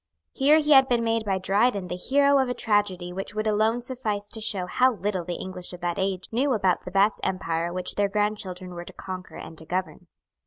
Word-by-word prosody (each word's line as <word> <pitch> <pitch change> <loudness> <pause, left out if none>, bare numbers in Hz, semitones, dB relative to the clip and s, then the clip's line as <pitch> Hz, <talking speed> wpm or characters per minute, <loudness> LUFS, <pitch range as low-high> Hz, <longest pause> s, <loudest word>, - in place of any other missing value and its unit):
Here 290 +3 +5
he 300 -1 +1
had 265 -2 +7
been 240 -2 +2
made 225 -1 0
by 195 -2 +1
Dryden 200 +1 +1
the 180 - -4
hero 280 +8 +3
of 260 -1 +1
a 250 - -2
tragedy 205 -6 0
which 195 +2 -5
would 215 0 -1
alone 220 +3 +1
suffice 215 -5 -3
to 220 - -7
show 200 -4 -1
how 255 +8 +3
little 195 -2 -2
the 175 +1 -4
English 185 -1 -7
of 180 - -9
that 175 +2 -2
age 190 -1 -1
knew 260 +4 +2
about 190 -5 +1
the - - -5
vast 195 +3 +2
empire 170 -2 -1
which 180 +1 -3
their 205 -1 +1
grandchildren 195 -3 -2
were 175 0 -6
to - - -11
conquer 185 -1 -8
and 160 -1 -8
to 160 - -11
govern. 185 0 -3
200 Hz, 225 wpm, -25 LUFS, 185-230 Hz, -, had